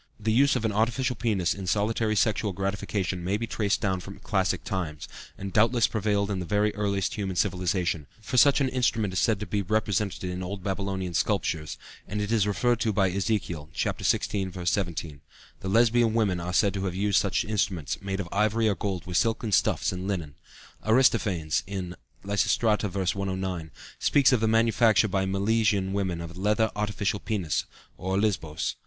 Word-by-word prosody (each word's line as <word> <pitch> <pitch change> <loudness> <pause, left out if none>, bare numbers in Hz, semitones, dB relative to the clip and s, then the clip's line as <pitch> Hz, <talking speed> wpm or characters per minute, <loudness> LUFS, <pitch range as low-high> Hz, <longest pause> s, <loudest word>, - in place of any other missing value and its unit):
The 110 +1 0
use 135 +4 +4
of 115 - -1
an 110 - +1
artificial 120 +4 0
penis 100 -6 0
in 95 -2 -7
solitary 110 +2 +1
sexual 105 -1 +1
gratification 95 -1 -2
may 95 +3 0
be 115 - -3
traced 105 -2 -1
down 95 -4 0
from 95 +2 -9
classic 95 -1 -1
times, 80 -6 -4 0.3
and 100 -1 -6
doubtless 115 +2 +4
prevailed 105 -1 0
in 95 - -1
the 90 - -4
very 105 +3 +1
earliest 100 -2 -1
human 95 -3 -3
civilization, 90 -4 0
for 110 +3 -5
such 140 +3 +6
an 135 - +2
instrument 115 -6 0
is 95 - +1
said 110 -3 +2
to - - -2
be 105 -1 -1
represented 100 -1 -1
in 90 0 -3
old 95 +1 -5
Babylonian 95 -2 -3
sculptures, 80 -3 -1 0.3
and 105 +2 -3
it 105 +1 -2
is 110 -3 +2
referred 120 +3 +1
to 115 -2 +1
by 95 -2 +2
Ezekiel 90 -6 -2
(Ch. - - 0
XVI. 95 -2 0
v. 90 -1 -7
17). 85 -5 -2 0.4
The 95 - -4
Lesbian 115 +1 +3
women 100 -6 +1
are 85 +1 -4
said 100 +2 +3
to 100 -1 -3
have 90 -2 -2
used 100 0 +2
such 100 - 0
instruments, 95 - -1
made 95 0 -3
of 95 - -3
ivory 110 +2 +2
or 105 - +3
gold 95 -4 -3
with 90 -1 -1
silken 115 0 0
stuffs 95 - +2
and 90 +1 -5
linen. 85 -8 -3 0.5
Aristophanes 110 - +2 0.6
(Lysistrata, 105 +1 +1
v. 95 - -7 0.2
109) 95 -4 -3 0.3
speaks 140 -2 +4
of 125 - +3
the 110 - +1
manufacture 115 -1 +4
by 95 -1 0
the 95 - -2
Milesian 100 -1 +1
women 95 -4 -1
of 85 0 -8
a - - -9
leather 105 +2 +2
artificial 105 -1 -1
penis, 95 -9 -1 0.3
or 95 +1 -1
olisbos. 85 -7 -1
100 Hz, 185 wpm, -27 LUFS, 95-110 Hz, 0.6 s, such